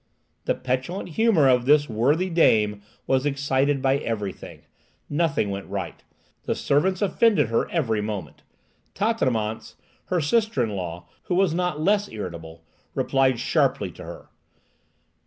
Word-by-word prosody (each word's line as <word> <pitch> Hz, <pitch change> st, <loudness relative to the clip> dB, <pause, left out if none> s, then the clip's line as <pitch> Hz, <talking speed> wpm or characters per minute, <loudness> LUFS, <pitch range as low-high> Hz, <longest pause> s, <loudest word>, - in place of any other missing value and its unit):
The -, -, +1 dB
petulant 130 Hz, +10 st, -3 dB
humour 175 Hz, -4 st, +3 dB
of 125 Hz, -2 st, +3 dB
this 145 Hz, 0 st, +5 dB
worthy 145 Hz, +12 st, +1 dB
dame 105 Hz, -11 st, +3 dB, 0.2 s
was 130 Hz, -1 st, +1 dB
excited 140 Hz, -1 st, 0 dB
by 135 Hz, 0 st, +3 dB
everything. 105 Hz, -6 st, -5 dB, 0.5 s
Nothing 145 Hz, -9 st, +1 dB
went 100 Hz, 0 st, -5 dB
right. -, -, -5 dB, 0.4 s
The -, -, -1 dB
servants 185 Hz, +8 st, +1 dB
offended 205 Hz, -, +3 dB
her 115 Hz, -, 0 dB
every 115 Hz, -11 st, 0 dB
moment. 105 Hz, -8 st, -5 dB, 0.5 s
Tatanémance, 125 Hz, -, -1 dB, 0.3 s
her 180 Hz, -, 0 dB
sister 210 Hz, -, +1 dB
in 110 Hz, -, -2 dB
law, 90 Hz, -2 st, -5 dB, 0.2 s
who 180 Hz, -, -1 dB
was 185 Hz, -3 st, +3 dB
not 180 Hz, -3 st, -1 dB
less 205 Hz, +4 st, +2 dB
irritable, 85 Hz, -5 st, -8 dB, 0.3 s
replied 135 Hz, -3 st, +2 dB
sharply -, -, +1 dB
to -, -, -11 dB
her. -, -, -10 dB
135 Hz, 135 wpm, -24 LUFS, 110-175 Hz, 0.5 s, this